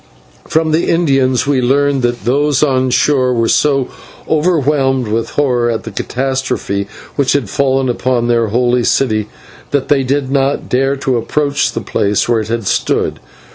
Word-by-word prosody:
From 160 0 +1
the 160 +2 +1
Indians 135 -7 +2
we 140 -2 +1
learned 140 +2 +1
that 120 -1 -2
those 140 +3 +2
on 130 -3 +1
shore 130 0 +2
were 115 -1 +1
so 135 -1 +1 0.4
overwhelmed 145 -6 +1
with 110 +2 -2
horror 125 -5 +1
at 115 -1 -2
the 110 - -7
catastrophe 130 -4 -2 0.3
which 140 -2 +2
had 130 -8 -1
fallen 135 -1 +1
upon 120 -1 0
their 115 -1 +2
holy 120 +2 +1
city, 110 -5 0 0.4
that 140 -2 -1
they 145 -2 +3
did 135 0 -1
not 140 0 0
dare 135 +2 +1
to 135 -2 -1
approach 140 +4 0
the - - -3
place 100 0 0
where 120 -1 +2
it 110 - -4
had 115 -1 -3
stood. - - 0
130 Hz, 165 wpm, -14 LUFS, 120-140 Hz, 0.4 s, they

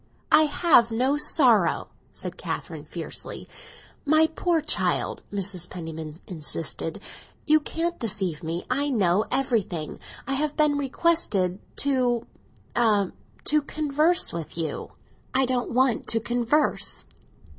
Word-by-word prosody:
"I 310 +1 +7
have 290 -6 +4
no 255 +5 +1
sorrow!" 250 - +3 0.2
said - - -7
Catherine - - -5
fiercely. - - -6 0.6
"My 310 +1 +5
poor 330 +1 0
child," 310 0 +1
Mrs. 190 -3 -2
Penniman 160 -3 -7
insisted, 160 +1 -3 0.5
"you 310 0 +5
can't 335 +3 -3
deceive 195 - -2
me. 165 +2 -4
I 280 +3 0
know 205 -5 +2
everything. 225 - -1 0.3
I 275 - -2
have 295 +2 -1
been 300 -1 +4
requested 265 - +1 0.2
to—a—to 240 -1 0
converse 305 +4 +1
with 165 -1 -6
you." 160 -3 -4 0.4
"I 265 0 +4
don't 250 -1 -1
want 255 -1 +2
to 225 - +3
converse!" 240 +6 0
245 Hz, 115 wpm, -25 LUFS, 185-295 Hz, 0.6 s, I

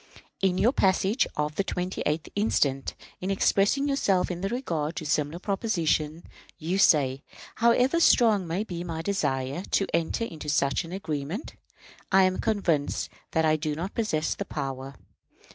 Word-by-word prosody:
In 190 -2 +2
your 240 +7 +3
message 195 +4 +2
of 150 0 -2
the 195 - +2
28th 180 -5 -2
inst., 205 -6 +3
in 135 +6 -6
expressing 200 +7 +2
yourself 200 -11 +1
in 175 0 -5
regard 175 - -2
to 160 - -4
a - - -5
similar 150 +1 0
proposition, 170 -6 -1 0.3
you 175 +4 -2
say: 140 -7 +4 0.4
"However 250 +7 +3
strong 220 - +4
may 175 +5 -1
be 175 -5 -5
my 165 -2 -4
desire 140 -6 -1
to 195 - +2
enter 170 +7 0
into 155 -7 -7
such 140 +2 +1
an 165 - -10
agreement, 165 - -4 0.6
I 190 0 +6
am 185 0 +1
convinced 175 -9 0 0.2
that 160 0 +2
I 155 0 +3
do 150 -1 -2
not 175 +6 -4
possess 160 -9 0
the - - -4
power. 135 -1 -5
175 Hz, 155 wpm, -27 LUFS, 150-200 Hz, 0.6 s, I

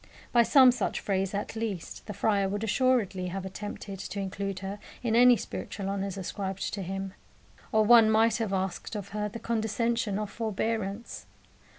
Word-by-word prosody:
By 240 - +6
some 260 +2 +7
such 245 - -2
phrase, 195 -1 -1
at 205 - -3
least, 220 -6 -5
the 210 - -4
friar 200 -1 +1
would 205 +2 -3
assuredly 225 -6 +1
have 190 +1 -4
attempted 200 0 -6
to 200 - -5
include 195 0 -3
her 195 +1 -5 0.2
in 230 -2 +1
any 245 0 +7
spiritual 195 -1 -5
honours 195 -1 -3
ascribed 195 0 -4
to 200 - -3
him. 195 +1 -4 0.6
Or 220 0 +4
one 230 -1 +7
might 220 0 +4
have 225 -4 -2
asked 190 +1 -2
of 205 -2 -5
her 210 0 -2
the 210 - -7
condescension 230 -1 -1
of 210 -1 -3
forbearance. 220 0 -3
205 Hz, 170 wpm, -28 LUFS, 195-225 Hz, 0.6 s, some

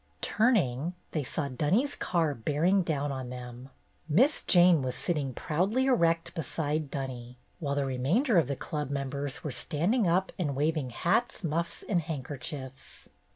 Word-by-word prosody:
Turning, 175 - +2 0.2
they 155 - -1
saw 140 +3 -2
Dunny's 165 - +1
car 165 -4 0
bearing 155 - +2
down 145 -4 -1
on 130 -2 -5
them. 125 +1 -8 0.4
Miss 255 - +4
Jane 175 -3 +6
was 130 -1 -2
sitting 150 -6 -1
proudly 190 - 0
erect 170 -10 +2
beside 155 -1 -2
Dunny, 125 -3 -5 0.2
while 140 -4 -1
the 140 -1 +1
remainder 170 - +2
of 155 - +1
the 140 - -2
Club 150 +1 -4
members 140 +2 -3
were 150 - -3
standing 180 - +1
up 185 +3 +2
and 145 -6 -1
wav 155 +3 +2
ing 140 -5 -2
hats, 175 - 0
muffs, 170 +1 -2
and 180 -5 +2
handkerchiefs. 135 -2 -7
150 Hz, 155 wpm, -29 LUFS, 135-175 Hz, 0.4 s, Jane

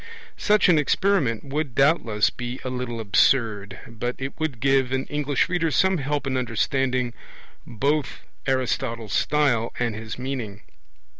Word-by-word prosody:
Such 210 -1 +4
an 170 -4 +5
experiment 150 - +1
would 140 -2 -3
doubtless 135 -8 +3
be 125 +1 -6
a 130 - -3
little 125 -2 -4
absurd, 110 -1 +2
but 120 +1 -4
it 135 +1 -4
would 155 -7 -2
give 135 0 +2
an 130 0 -1
English 145 -2 +1
reader 175 -3 0
some 190 +5 +2
help 145 +1 -2
in 130 -1 -1
understanding 125 +1 0 0.5
both 140 +5 -1 0.3
Aristotle's 125 -4 -1
style 135 -5 +2
and 120 -2 0
his 110 +1 -7
meaning. 125 -6 -5
130 Hz, 140 wpm, -24 LUFS, 115-145 Hz, 0.5 s, an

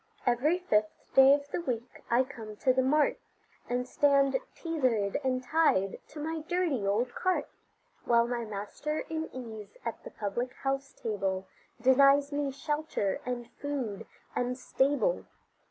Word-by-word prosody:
Every 255 +8 +3
fifth 215 -13 -1
day 270 0 +8
of 285 0 -6
the - - -1
week 245 -6 -4
I 240 +2 +4
come 225 -5 -9
to 255 +4 +2
the 260 - +3
mart, 290 +3 +2 0.5
And 250 +1 -1
stand 280 0 +3 0.2
tethered 255 - 0
and 255 -1 0
tied 250 -10 +2
to 305 - -10
my 320 +2 -2
dirty 315 - 0
old 235 +5 +1
cart, 370 0 0 0.6
While 235 0 +4
my 240 -1 -2
master 215 +9 -4
in 320 0 -2
ease 225 - -8
at - - -4
the - - -7
public 240 +5 -3
house 275 0 -1
table, 195 -4 -2 0.3
Denies 275 +3 +5
me 285 -1 0
shelter, 295 -8 -2
and 240 -1 -4
food, 265 -9 -4 0.3
and 250 0 -1
stable. 285 - +1
255 Hz, 145 wpm, -30 LUFS, 230-290 Hz, 0.6 s, day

